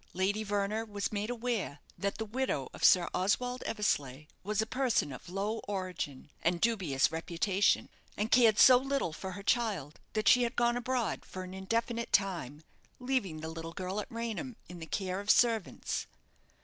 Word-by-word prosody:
Lady 195 Hz, +4 st, 0 dB
Verner 205 Hz, +1 st, -1 dB
was 205 Hz, -2 st, -3 dB
made 210 Hz, +1 st, -2 dB
aware 235 Hz, -10 st, -2 dB, 0.2 s
that 200 Hz, 0 st, -2 dB
the 220 Hz, -, -3 dB
widow 215 Hz, -, -2 dB
of -, -, -9 dB
Sir 175 Hz, -2 st, +6 dB
Oswald 245 Hz, +7 st, 0 dB
Eversleigh 145 Hz, -, -1 dB, 0.2 s
was 210 Hz, +1 st, -2 dB
a 220 Hz, -, +3 dB
person 250 Hz, -, 0 dB
of 130 Hz, -, -10 dB
low 205 Hz, +4 st, -2 dB
origin, 180 Hz, -8 st, -4 dB
and 170 Hz, +1 st, +1 dB
dubious 180 Hz, -, +2 dB
reputation, 170 Hz, +4 st, +1 dB, 0.3 s
and 215 Hz, +2 st, -1 dB
cared 230 Hz, -4 st, +6 dB
so 255 Hz, -1 st, +9 dB
little 270 Hz, -, -1 dB
for 190 Hz, +3 st, -6 dB
her 200 Hz, +2 st, -8 dB
child 200 Hz, -, 0 dB
that 215 Hz, -1 st, 0 dB
she 250 Hz, -, +7 dB
had 240 Hz, +1 st, 0 dB
gone 240 Hz, 0 st, +2 dB
abroad, 245 Hz, -5 st, -1 dB
for 185 Hz, -, -7 dB
an 185 Hz, 0 st, -8 dB
indefinite 230 Hz, +4 st, -2 dB
time, 170 Hz, -7 st, 0 dB, 0.3 s
leaving 250 Hz, -11 st, -1 dB
the 160 Hz, -, -4 dB
little 165 Hz, 0 st, -7 dB
girl 185 Hz, +3 st, -3 dB
at 210 Hz, -, -6 dB
Raynham, 230 Hz, +2 st, -4 dB
in 175 Hz, -1 st, -9 dB
the 160 Hz, -, -7 dB
care 185 Hz, 0 st, -2 dB
of 205 Hz, +1 st, -7 dB
servants. 225 Hz, -4 st, +2 dB
205 Hz, 175 wpm, -31 LUFS, 180-230 Hz, 0.3 s, so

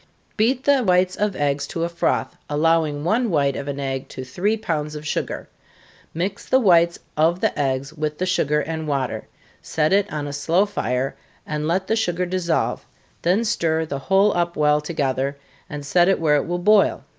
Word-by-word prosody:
Beat 245 Hz, +4 st, +1 dB
the 280 Hz, -2 st, +4 dB
whites 180 Hz, -2 st, +2 dB
of 205 Hz, -2 st, -1 dB
eggs 140 Hz, -1 st, 0 dB
to 165 Hz, -, -3 dB
a -, -, +1 dB
froth, 170 Hz, 0 st, -1 dB
allowing 155 Hz, -1 st, +1 dB
one 225 Hz, +7 st, +1 dB
white 140 Hz, -5 st, +1 dB
of 140 Hz, -, -5 dB
an 140 Hz, 0 st, -4 dB
egg 135 Hz, -1 st, -3 dB
to 130 Hz, -, -7 dB
three 185 Hz, +12 st, -1 dB
pounds 155 Hz, -8 st, -3 dB
of 150 Hz, 0 st, -7 dB
sugar -, -, -3 dB, 0.6 s
mix 190 Hz, +5 st, -4 dB
the 260 Hz, -, +5 dB
whites 170 Hz, -6 st, +4 dB, 0.2 s
of 165 Hz, +3 st, +2 dB
the -, -, 0 dB
eggs 135 Hz, 0 st, -1 dB
with 155 Hz, -1 st, -3 dB
the 185 Hz, -, -1 dB
sugar 150 Hz, -5 st, +1 dB
and 160 Hz, 0 st, -4 dB
water, 135 Hz, -3 st, -2 dB, 0.3 s
set 155 Hz, +2 st, 0 dB
it 200 Hz, 0 st, +2 dB
on 150 Hz, -1 st, -3 dB
a 145 Hz, -, -5 dB
slow 165 Hz, +7 st, +2 dB
fire, 130 Hz, -, -2 dB, 0.3 s
and 150 Hz, 0 st, -3 dB
let 185 Hz, +3 st, 0 dB
the 220 Hz, -, +1 dB
sugar 180 Hz, -5 st, 0 dB
dissolve, 175 Hz, -2 st, -1 dB, 0.4 s
then 190 Hz, +7 st, +2 dB
stir 160 Hz, -6 st, 0 dB
the 140 Hz, -3 st, -4 dB
whole 195 Hz, +8 st, +3 dB
up 175 Hz, 0 st, -1 dB
well 150 Hz, 0 st, +3 dB
together, 140 Hz, -3 st, -2 dB, 0.3 s
and 145 Hz, -1 st, -6 dB
set 175 Hz, +4 st, +3 dB
it 195 Hz, -, +2 dB
where 150 Hz, -3 st, +3 dB
it -, -, -2 dB
will 175 Hz, +1 st, -1 dB
boil. 205 Hz, +3 st, +3 dB
165 Hz, 190 wpm, -22 LUFS, 145-185 Hz, 0.6 s, the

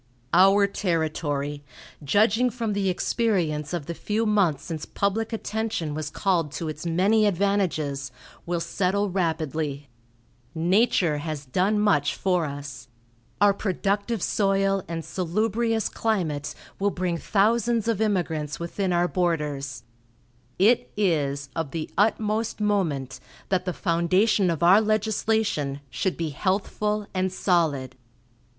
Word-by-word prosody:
"Our 195 Hz, +2 st, +6 dB
territory, 155 Hz, -6 st, -2 dB, 0.4 s
judging 215 Hz, -, +3 dB
from 230 Hz, -2 st, -3 dB
the 200 Hz, -1 st, 0 dB
experience 175 Hz, -7 st, 0 dB
of 170 Hz, -5 st, -3 dB
the 170 Hz, -, -4 dB
few 215 Hz, +6 st, -1 dB
months 195 Hz, -9 st, +2 dB
since 160 Hz, -2 st, -5 dB
public 210 Hz, +3 st, -1 dB
attention 220 Hz, -8 st, -3 dB
was 155 Hz, 0 st, -4 dB
called 170 Hz, -6 st, 0 dB
to 160 Hz, +2 st, -4 dB
its 155 Hz, +2 st, -5 dB
many 200 Hz, +6 st, +3 dB
advantages, 170 Hz, -8 st, 0 dB, 0.4 s
will 175 Hz, 0 st, 0 dB
settle 200 Hz, +3 st, 0 dB
rapidly. 155 Hz, -5 st, -2 dB, 0.7 s
Nature 175 Hz, -2 st, +2 dB
has 150 Hz, -2 st, -5 dB
done 190 Hz, +11 st, +1 dB
much 145 Hz, -9 st, +2 dB
for 180 Hz, -3 st, +1 dB
us. 140 Hz, -2 st, -7 dB, 0.5 s
Our 205 Hz, -1 st, +5 dB
productive 200 Hz, +1 st, -1 dB
soil 195 Hz, +1 st, +1 dB
and 165 Hz, -1 st, -5 dB
salubrious 220 Hz, +5 st, 0 dB
climate 155 Hz, -9 st, -2 dB, 0.2 s
will 200 Hz, +1 st, +2 dB
bring 180 Hz, -3 st, -2 dB
thousands 225 Hz, +2 st, +1 dB
of 225 Hz, -2 st, 0 dB
immigrants 165 Hz, -8 st, -1 dB
within 180 Hz, +3 st, -2 dB
our 175 Hz, 0 st, +2 dB
borders; 150 Hz, -8 st, -2 dB, 0.7 s
it 215 Hz, +6 st, +3 dB
is 145 Hz, -8 st, 0 dB
of 165 Hz, -3 st, -2 dB
the 160 Hz, +1 st, -5 dB
utmost 215 Hz, +2 st, +1 dB
moment 165 Hz, -11 st, -1 dB, 0.3 s
that 185 Hz, -1 st, +1 dB
the 180 Hz, -, -1 dB
foundation 185 Hz, +3 st, +2 dB
of 165 Hz, -1 st, -1 dB
our 190 Hz, +5 st, +7 dB
legislation 215 Hz, -8 st, 0 dB
should 185 Hz, +8 st, -1 dB
be 165 Hz, -2 st, -2 dB
healthful 205 Hz, +6 st, -1 dB
and 185 Hz, 0 st, 0 dB
solid. 160 Hz, -9 st, 0 dB
185 Hz, 125 wpm, -25 LUFS, 155-205 Hz, 0.7 s, our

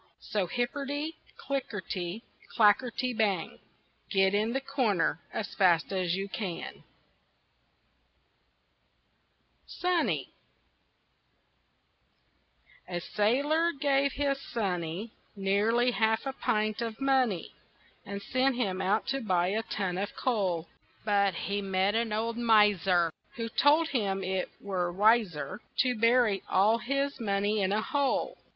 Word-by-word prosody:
So 200 Hz, -4 st, -2 dB
hipperty, 285 Hz, -, -2 dB, 0.2 s
clickerty, 205 Hz, -7 st, -4 dB, 0.3 s
clackerty, 235 Hz, +3 st, +3 dB
bang, 200 Hz, -6 st, 0 dB, 0.5 s
Get 195 Hz, -1 st, +3 dB
in 215 Hz, +4 st, +1 dB
a -, -, +2 dB
corner 240 Hz, -, 0 dB
as 215 Hz, -, -4 dB
fast 175 Hz, -2 st, +3 dB
as 180 Hz, -2 st, 0 dB
you 195 Hz, +1 st, -3 dB
can! 195 Hz, -4 st, -5 dB, 2.8 s
SONNY 360 Hz, -2 st, -1 dB, 2.5 s
A 175 Hz, -1 st, -3 dB
sailor 280 Hz, -, +1 dB
gave 280 Hz, -1 st, +1 dB
his 275 Hz, -1 st, -1 dB
sonny 190 Hz, -3 st, -3 dB, 0.2 s
Nearly 210 Hz, +5 st, +2 dB
half 220 Hz, 0 st, +1 dB
a 270 Hz, -, -2 dB
pint 215 Hz, -3 st, -1 dB
of 225 Hz, -1 st, -4 dB
money 260 Hz, -9 st, +1 dB, 0.5 s
And 200 Hz, -1 st, -6 dB
sent 260 Hz, +3 st, +1 dB
him 195 Hz, -6 st, -1 dB
out 200 Hz, +4 st, +1 dB
to 270 Hz, 0 st, -1 dB
buy 180 Hz, -5 st, +1 dB
a 215 Hz, +3 st, 0 dB
ton 190 Hz, -5 st, -3 dB
of 200 Hz, -, -4 dB
coal; 190 Hz, -9 st, -1 dB, 0.4 s
But 200 Hz, -3 st, +2 dB
he 200 Hz, +4 st, -2 dB
met 190 Hz, 0 st, +1 dB
a 230 Hz, +1 st, +2 dB
poor 215 Hz, -2 st, -2 dB
old 230 Hz, +1 st, -2 dB
miser 200 Hz, -7 st, +4 dB, 0.2 s
Who 230 Hz, -1 st, -4 dB
told 300 Hz, +7 st, +3 dB
him 195 Hz, -7 st, -1 dB
it 185 Hz, 0 st, -2 dB
were 185 Hz, -3 st, -2 dB
wiser 205 Hz, -2 st, +2 dB, 0.2 s
To 255 Hz, -2 st, +2 dB
bury 230 Hz, -3 st, +3 dB
all 210 Hz, +5 st, +3 dB
his 275 Hz, +4 st, -2 dB
money 205 Hz, -1 st, 0 dB
in 190 Hz, 0 st, +1 dB
a 215 Hz, +2 st, +1 dB
hole. 280 Hz, 0 st, -1 dB
215 Hz, 120 wpm, -29 LUFS, 195-250 Hz, 2.8 s, miser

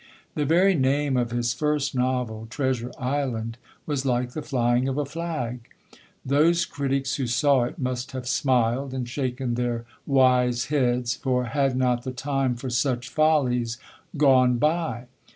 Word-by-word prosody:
The 150 Hz, -, -1 dB
very 180 Hz, +6 st, +4 dB
name 140 Hz, -1 st, +1 dB
of 120 Hz, -2 st, +1 dB
his 120 Hz, 0 st, -1 dB
first 150 Hz, +1 st, 0 dB
novel, 125 Hz, -4 st, -1 dB
Treasure 130 Hz, -2 st, -2 dB
Island, 125 Hz, -4 st, -2 dB, 0.3 s
was 145 Hz, -3 st, -2 dB
like 125 Hz, -2 st, 0 dB
the 155 Hz, -, -5 dB
flying 125 Hz, -2 st, +1 dB
of 135 Hz, +1 st, -2 dB
a 145 Hz, -, 0 dB
flag. 140 Hz, -6 st, -4 dB, 0.6 s
Those 160 Hz, +5 st, +3 dB
critics 135 Hz, -2 st, -2 dB
who 135 Hz, -3 st, -1 dB
saw 130 Hz, +1 st, +3 dB
it 125 Hz, -, -7 dB
must 130 Hz, -2 st, -3 dB
have 130 Hz, -1 st, -5 dB
smiled, 130 Hz, 0 st, +1 dB
and 125 Hz, -2 st, -3 dB
shaken 130 Hz, -1 st, -2 dB
their 120 Hz, -1 st, -2 dB, 0.2 s
wise 125 Hz, -2 st, +3 dB
heads, 125 Hz, -3 st, +1 dB
for 125 Hz, -1 st, 0 dB
had 135 Hz, +1 st, 0 dB
not 125 Hz, -2 st, +1 dB
the 130 Hz, -, -4 dB
time 135 Hz, 0 st, -1 dB
for 125 Hz, +1 st, -6 dB
such 125 Hz, 0 st, 0 dB
follies 125 Hz, -7 st, +1 dB, 0.4 s
gone 130 Hz, -4 st, +4 dB
by? 150 Hz, -4 st, 0 dB
130 Hz, 150 wpm, -25 LUFS, 120-140 Hz, 0.6 s, very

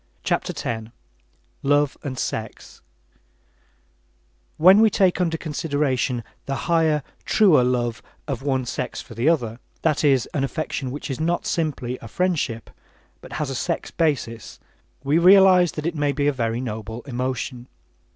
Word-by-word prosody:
CHAPTER -, -, 0 dB
X 110 Hz, -1 st, -3 dB, 0.7 s
LOVE 145 Hz, 0 st, +2 dB
AND 130 Hz, -3 st, -5 dB
SEX 110 Hz, -2 st, -5 dB, 1.8 s
When 185 Hz, +5 st, +7 dB
we 220 Hz, 0 st, +6 dB
take 190 Hz, -2 st, +2 dB
under 165 Hz, -2 st, 0 dB
consideration 145 Hz, -6 st, -1 dB, 0.2 s
the 135 Hz, -, -1 dB
higher, 160 Hz, -3 st, +2 dB, 0.2 s
truer 185 Hz, -12 st, +5 dB
love 120 Hz, -2 st, 0 dB, 0.3 s
of 135 Hz, -4 st, -3 dB
one 135 Hz, -2 st, 0 dB
sex 125 Hz, +1 st, -4 dB
for -, -, -10 dB
the 120 Hz, +7 st, +2 dB
other, 120 Hz, -8 st, 0 dB, 0.2 s
that 155 Hz, -2 st, +1 dB
is, 135 Hz, -4 st, +4 dB
an 140 Hz, -, 0 dB
affection 135 Hz, -2 st, -3 dB
which 140 Hz, +2 st, -5 dB
is 130 Hz, -, -4 dB
not 170 Hz, +2 st, 0 dB
simply 135 Hz, -6 st, -2 dB
a -, -, -9 dB
friendship, 140 Hz, -7 st, -1 dB, 0.5 s
but -, -, -11 dB
has 150 Hz, -3 st, -2 dB
a -, -, -3 dB
sex 170 Hz, +6 st, -2 dB
basis, 125 Hz, -, -2 dB, 0.4 s
we 145 Hz, +4 st, +2 dB
realize 185 Hz, -1 st, +6 dB
that 155 Hz, -, -5 dB
it 170 Hz, -, 0 dB
may 145 Hz, -2 st, 0 dB
be 145 Hz, +1 st, -1 dB
a 145 Hz, -, +3 dB
very 115 Hz, -2 st, -1 dB
noble 110 Hz, -1 st, -5 dB
emotion. 125 Hz, -1 st, -4 dB
140 Hz, 150 wpm, -23 LUFS, 125-165 Hz, 1.8 s, When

